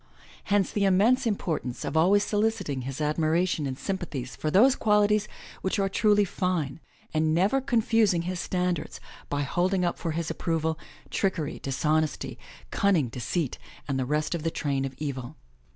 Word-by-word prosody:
Hence 200 Hz, -2 st, +2 dB
the 205 Hz, -, 0 dB
immense 220 Hz, +7 st, +4 dB
importance 160 Hz, -, -2 dB
of 145 Hz, -, -4 dB
always 190 Hz, +6 st, +4 dB
soliciting 210 Hz, -11 st, 0 dB
his 135 Hz, +3 st, -5 dB
admiration 155 Hz, +1 st, +1 dB
and 130 Hz, -1 st, -4 dB
sympathy 170 Hz, -5 st, -3 dB
for 145 Hz, +4 st, -4 dB
those 245 Hz, -, +5 dB
qualities 210 Hz, 0 st, +3 dB, 0.3 s
which 190 Hz, -, -1 dB
are 195 Hz, -1 st, +2 dB
truly 205 Hz, 0 st, +3 dB
fine 175 Hz, -7 st, -2 dB, 0.3 s
and 155 Hz, 0 st, +2 dB
never 200 Hz, +10 st, +3 dB
confusing 225 Hz, -7 st, +2 dB
his 180 Hz, 0 st, -3 dB
standards 180 Hz, -4 st, -2 dB, 0.3 s
by 145 Hz, 0 st, 0 dB
holding 180 Hz, +6 st, +1 dB
up 175 Hz, -, -1 dB
for 165 Hz, -3 st, -2 dB
his 165 Hz, 0 st, -2 dB
approval, 160 Hz, -1 st, -1 dB, 0.3 s
trickery, 170 Hz, -6 st, -1 dB
dishonesty, 155 Hz, +3 st, -1 dB, 0.3 s
cunning, 180 Hz, -11 st, +2 dB
deceit, 130 Hz, +5 st, -2 dB, 0.3 s
and 135 Hz, -2 st, -1 dB
the 130 Hz, -, 0 dB
rest 150 Hz, +3 st, 0 dB
of 170 Hz, -, -2 dB
the 165 Hz, -, 0 dB
train 140 Hz, -4 st, -1 dB
of 135 Hz, -1 st, -6 dB
evil. 135 Hz, -1 st, -5 dB
170 Hz, 155 wpm, -27 LUFS, 150-200 Hz, 0.3 s, those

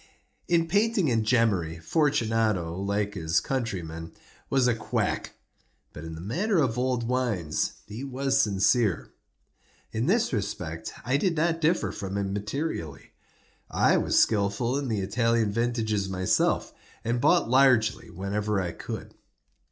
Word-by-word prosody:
In 165 Hz, -1 st, +2 dB
painting 205 Hz, -, +2 dB
and 115 Hz, -2 st, +2 dB
gemmary, 110 Hz, -8 st, +1 dB
Fortunato, 110 Hz, -, +1 dB
like 100 Hz, +2 st, -1 dB
his 80 Hz, -3 st, +1 dB
countrymen, 85 Hz, -11 st, -4 dB, 0.4 s
was 135 Hz, -2 st, +3 dB
a 125 Hz, -, +3 dB
quack—but 110 Hz, -7 st, -5 dB
in 80 Hz, 0 st, -7 dB
the 80 Hz, -, -8 dB
matter 180 Hz, -, 0 dB
of 130 Hz, -8 st, +2 dB
old 125 Hz, -2 st, 0 dB
wines 105 Hz, -6 st, -1 dB
he 110 Hz, +5 st, -7 dB
was 135 Hz, 0 st, +1 dB
sincere. 105 Hz, -, +1 dB, 0.8 s
In 115 Hz, +4 st, -1 dB
this 220 Hz, -, +2 dB
respect 90 Hz, -7 st, -3 dB
I 130 Hz, +3 st, +2 dB
did 175 Hz, +2 st, +1 dB
not 165 Hz, +1 st, +1 dB
differ 155 Hz, -, +2 dB
from 100 Hz, -1 st, -5 dB
him 100 Hz, -1 st, -2 dB
materially: 105 Hz, -, -4 dB, 0.6 s
I -, -, +3 dB
was -, -, +1 dB
skilful 110 Hz, +4 st, +1 dB
in 140 Hz, -1 st, -2 dB
the 110 Hz, -4 st, -1 dB
Italian 115 Hz, +2 st, +1 dB
vintages 110 Hz, -3 st, -1 dB
myself, 95 Hz, -1 st, +1 dB, 0.3 s
and 120 Hz, +1 st, -1 dB
bought 165 Hz, +2 st, +4 dB
largely 130 Hz, -3 st, +3 dB
whenever 100 Hz, +3 st, -2 dB
I 90 Hz, -2 st, -2 dB
could. 115 Hz, +4 st, -7 dB
110 Hz, 135 wpm, -27 LUFS, 100-130 Hz, 0.8 s, bought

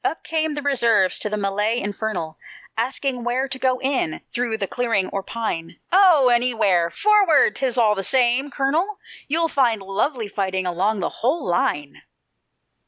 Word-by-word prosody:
Up 320 Hz, -, -2 dB
came 315 Hz, -2 st, -2 dB
the 290 Hz, -, -5 dB
reserves 235 Hz, -9 st, +2 dB
to 210 Hz, -, +1 dB
the 210 Hz, -, -2 dB
mellay 210 Hz, +3 st, 0 dB
infernal, 200 Hz, -6 st, -4 dB, 0.4 s
Asking 250 Hz, +2 st, -2 dB
where 250 Hz, +3 st, -1 dB
to 265 Hz, 0 st, -6 dB
go 255 Hz, -1 st, +1 dB
in, 265 Hz, -, -1 dB
through 240 Hz, -3 st, -1 dB
the 200 Hz, -, -2 dB
clearing 225 Hz, -3 st, -1 dB
or 195 Hz, -, -2 dB
pine? 190 Hz, -6 st, -5 dB
"Oh, 350 Hz, -8 st, +5 dB
anywhere! 225 Hz, -8 st, +2 dB
Forward! 390 Hz, -, +3 dB
'Tis 260 Hz, -2 st, -1 dB
all 220 Hz, -3 st, +4 dB
the 195 Hz, -1 st, -3 dB
same, 255 Hz, +3 st, +2 dB
Colonel: 315 Hz, +10 st, -1 dB, 0.3 s
You'll 330 Hz, +3 st, +1 dB
find 245 Hz, -8 st, +1 dB
lovely 210 Hz, +5 st, -2 dB
fighting 190 Hz, -2 st, -2 dB
along 190 Hz, +4 st, -1 dB
the -, -, -1 dB
whole 275 Hz, +7 st, 0 dB
line!" 145 Hz, -4 st, -1 dB
235 Hz, 160 wpm, -22 LUFS, 200-275 Hz, 0.4 s, Oh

